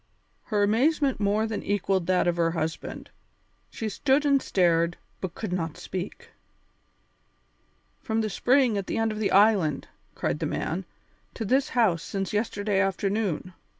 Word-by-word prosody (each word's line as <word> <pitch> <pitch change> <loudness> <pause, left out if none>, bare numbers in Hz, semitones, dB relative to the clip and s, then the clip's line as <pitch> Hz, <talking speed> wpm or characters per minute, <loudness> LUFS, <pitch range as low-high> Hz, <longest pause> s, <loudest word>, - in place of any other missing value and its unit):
Her 210 -3 +1
amazement 265 +6 +2
more 210 +1 +1
than 220 -2 -3
equalled 195 -3 0
that 185 -1 +2
of 175 0 +1
her 165 -1 +2
husband; 165 -1 -4 0.6
she 225 - -4
stood 270 +7 +1
and 280 -2 +4
stared, 170 -4 +2 0.2
but 185 -3 -5
could 210 -5 -4
not 165 -4 -3
speak. 205 - -6 1.7
"From 225 -1 -1
the 215 - -1
spring 250 -4 +3
at 195 - -6
the - - -2
end 225 0 +1
of 215 - -5
the 210 - +1
island," 195 -8 +3 0.3
cried - - -2
the - - -1
man, - - -3 0.5
"to 225 - -3
this 265 +6 +2
house 190 -9 +3
since 195 +2 -4
yesterday 205 -2 0
afternoon! 195 -2 -1
205 Hz, 150 wpm, -26 LUFS, 185-225 Hz, 1.7 s, and